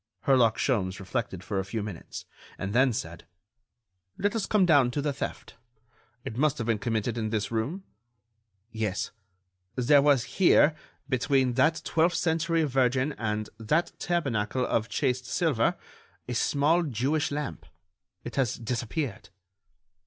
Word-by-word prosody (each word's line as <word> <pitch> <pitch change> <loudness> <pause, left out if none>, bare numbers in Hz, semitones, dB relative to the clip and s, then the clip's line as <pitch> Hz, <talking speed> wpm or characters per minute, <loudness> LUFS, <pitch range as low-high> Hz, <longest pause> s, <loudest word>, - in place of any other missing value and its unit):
Herlock 125 -5 +3
Sholmes 100 -7 0
reflected 95 -2 -4
for 95 0 -2
a - - -1
few 100 +3 -4
minutes, 100 -6 -7 0.3
and 95 +1 -4
then 130 +2 +4
said: 85 -8 -6 0.9
"Let 205 +2 0
us 220 - -1
come 210 -3 +3
down 145 -7 +5
to 135 - -3
the 145 -1 0
theft. 135 - -6 0.7
It 120 -4 -5
must 150 +1 +2
have 115 - -3
been 115 -2 0
committed 115 0 -1
in 110 -1 -2
this 105 -1 -2
room?" 130 - -2 0.9
"Yes; 110 -3 -2 0.6
there 140 +3 +5
was 140 -4 +4
here, 165 -3 +4 0.3
between 130 -1 +1
that 155 +5 +2
twelfth 165 +2 +2
century 165 0 +1
Virgin 130 0 +1
and 110 -1 -2
that 150 +10 +1
tabernacle 130 -8 0
of 115 0 0
chased 125 -3 -1
silver, 150 -10 +1 0.5
a 125 - -3
small 145 +7 +2
Jewish 145 +1 0
lamp. 145 - -4 0.6
It - - -7
has 130 -5 +1
disappeared." 120 +1 -4
130 Hz, 140 wpm, -27 LUFS, 110-150 Hz, 0.9 s, down